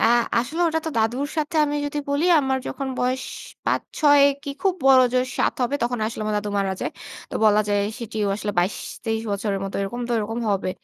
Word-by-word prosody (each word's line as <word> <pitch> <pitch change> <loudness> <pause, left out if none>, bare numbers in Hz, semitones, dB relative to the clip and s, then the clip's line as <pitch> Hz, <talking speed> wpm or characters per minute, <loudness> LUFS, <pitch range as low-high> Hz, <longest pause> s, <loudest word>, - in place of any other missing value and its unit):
আ - - 0 0.4
আসলে 285 +8 -2
ওটা 320 0 0
তো - - -1
দাদুর 240 +6 +1
সাথে 305 +1 -1
আমি 295 0 -1
যদি 290 +1 -3
বলি, 285 +3 +1 0.2
আমার 265 -1 0
যখন 275 -1 -4
বয়স 255 +1 0 0.4
৫-৬ 290 -2 +3 0.2
কি 285 - -5
খুব 385 -2 +2
বড় 265 -1 +8
জোর 255 0 +2
৭ - - +2
হবে 245 +3 0
তখন 240 +1 0
আসলে 220 - -5
আমার 215 0 -1
দাদু 205 0 -4
মারা 195 -1 0
যায়। - - -2 0.4
তো - - -7
বলা 210 -1 +5
যায় 205 0 +2 0.2
সেটিও 220 -3 -3
আসলে 210 0 -3
২২-২৩ 220 +4 -2
বছরের 200 -1 -1
মতো 195 - -6
এরকম 235 +5 -4
তো - - -1
এরকম 225 +2 -3
হবে। 195 -2 0
240 Hz, 205 wpm, -23 LUFS, 210-280 Hz, 0.4 s, বড়